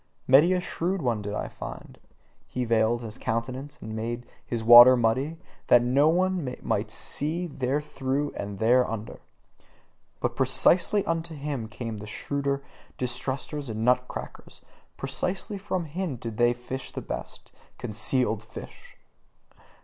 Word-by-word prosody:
Many 145 +7 +6
a 180 - +2
shrewd 180 +1 -2
one 115 -4 0
did 105 0 -4
I - - -2
find: - - -9 0.5
he 125 -1 -2
veiled 115 +1 +2
his 115 +2 -6
countenance 130 +5 -3
and 110 0 -6
made 120 +2 -4 0.2
his 115 -2 -3
water 120 +2 +10
muddy, 130 +8 +1 0.3
that 120 -1 +6
no 135 +5 +4
one 175 -6 0
might 105 +1 -1
see 155 +9 -2
therethrough 140 0 -2
and 100 0 -5
thereunder. 115 -1 +1 1.0
But - - -1
precisely 195 +3 +3
unto 165 0 -2
him 140 -5 -4
came 115 -1 -6
the 105 - -8
shrewder 140 +5 -2 0.3
distrusters 130 +3 -3
and 110 0 -2
nut 125 0 +3
crackers: - - -9 0.4
precisely 180 +9 -3
from 185 -3 -2
him 165 -1 -3
did 115 -2 -6
they 120 0 +4
fish 125 +2 -7
his - - -6
best - - -7 0.3
concealed 110 -1 0
fish! 110 - -11
125 Hz, 135 wpm, -27 LUFS, 115-150 Hz, 1.0 s, water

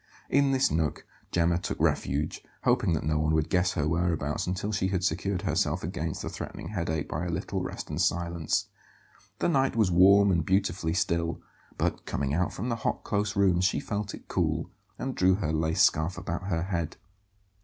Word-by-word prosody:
In 140 0 +4
this 135 0 +2
nook 80 -2 -1 0.3
Gemma 85 0 +2
took - - -4
refuge, 70 +2 0 0.2
hoping 85 - +3
that 80 - -1
no 75 +1 +1
one 80 +1 +2
would 80 -1 0
guess 90 0 +2
her 75 -1 0
whereabouts 80 -3 0
until 95 +3 -2
she 100 -3 0
had 95 -1 -1
secured 95 +2 -1
herself 85 -4 0
against 80 -2 -3
the - - -3
threatening - - -7
headache 85 -6 -2
by - - -3
a - - -3
little 80 - -2
rest - - -5
and - - -2
silence. 85 -2 0 0.7
The - - +1
night 135 -7 +2
was 110 -5 +3
warm 100 +3 +6
and 85 -3 +2
beautifully 95 -2 0
still; 85 -3 0 0.4
but - - -1
coming 70 0 -1
out 90 +4 +1
from 115 +7 -4
the 115 - -1
hot, - - -2
close 105 0 -1
rooms 95 -3 +3
she 95 - +2
felt 105 0 -3
it - - -15
cool, - - -1 0.3
and 135 - -3
drew 95 -3 +4
her 85 -6 -2
lace 80 +1 +2
scarf 80 +4 +2
about 90 +3 -4
her 85 -4 0
head. 85 -4 -3
90 Hz, 190 wpm, -28 LUFS, 80-100 Hz, 0.7 s, warm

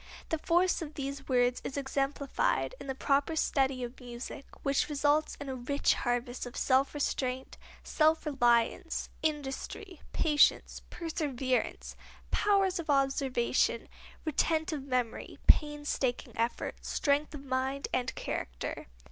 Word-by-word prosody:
The 320 - 0
force 360 +3 +2
of 310 -2 -6
these 275 0 -5
words 245 -1 +3
is 270 - -4
exemplified 280 - 0
in - - -8
the 265 - -2
proper 280 +4 +1
study 265 -4 +1
of 240 +1 -7
music, 245 +2 -7 0.2
which 275 +2 +1
results 295 +1 +2
in 285 - -6
a 265 - -3
rich 260 +3 +1
harvest 245 0 -2
of 245 - -9
self 270 +2 +2
restraint, 260 -2 -2 0.3
self 315 +1 +2
reliance, 250 +4 +2
industry, 310 +5 -3
patience, 300 -2 +3
perseverance, 275 -6 -2 0.4
powers 395 -3 +3
of 330 -2 -6
observation, 270 -4 +2 0.4
retentive 315 0 +1
memory, 250 -4 -2
painstaking 295 -4 +2
effort, 230 +1 -2
strength 290 +1 +1
of 280 -1 -9
mind 265 +1 -1
and 255 0 0
character. - - -4
275 Hz, 120 wpm, -31 LUFS, 255-305 Hz, 0.4 s, words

